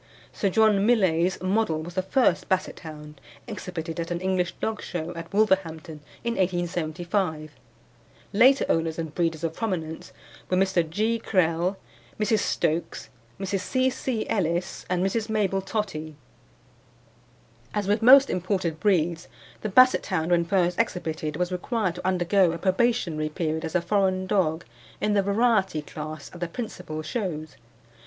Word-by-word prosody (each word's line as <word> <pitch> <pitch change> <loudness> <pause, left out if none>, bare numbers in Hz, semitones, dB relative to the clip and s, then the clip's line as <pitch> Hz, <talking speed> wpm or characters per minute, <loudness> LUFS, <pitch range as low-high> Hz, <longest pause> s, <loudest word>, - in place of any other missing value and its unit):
Sir 200 - 0
John 210 0 +4
Millais' 190 -6 +2
Model 185 -5 +1
was 175 +2 -8
the 185 - 0
first 255 +7 +1
Basset 190 -2 -1
hound 150 -3 -10 0.2
exhibited 180 -6 -6
at 165 - -3
an 175 -1 -2
English 185 -2 0
dog 220 -1 -3
show, 175 -1 -4
at 165 -1 -8
Wolverhampton 175 -7 0 0.2
in 235 0 0
1875. 175 -2 -1 0.8
Later 260 +6 +5
owners 165 -1 0
and 160 -2 -4
breeders 165 -2 -1
of 165 -1 -1
prominence 165 -7 -4 0.4
were 185 - +2
Mr. 185 -4 +2
G. 220 +7 0
Krehl, 180 -2 +1 0.4
Mrs. 215 0 +2
Stokes, 160 +2 -1 0.3
Mrs. 195 0 -1
C. 255 +6 +1
C. 245 -3 -3
Ellis 175 -3 -1
and 180 0 +1
Mrs. 215 +3 -1
Mabel 200 -3 +1
Tottie. 190 -7 -4 1.6
As 205 -2 -2
with 210 +2 +2
most 270 +4 +8
imported 180 -3 -1
breeds, 170 -4 +1 0.3
the 215 - -2
Basset 255 +5 +5
hound 180 -3 -1
when 170 -1 +3
first 180 +1 +1
exhibited 160 -8 -2
was 180 +2 -1
required 185 +1 -1
to 180 +2 -5
undergo 185 -1 +3
a - - -4
probationary 185 -5 +1
period 160 -1 -2
as 160 0 -4
a 180 - +3
foreign 190 -1 +1
dog 170 -4 0 0.3
in 210 0 +1
the 200 - +4
variety 200 -5 +1
class 155 0 -7
at 175 - -10
the 175 - -2
principal 165 -6 -6
shows. 155 - -4
180 Hz, 150 wpm, -26 LUFS, 165-205 Hz, 1.6 s, most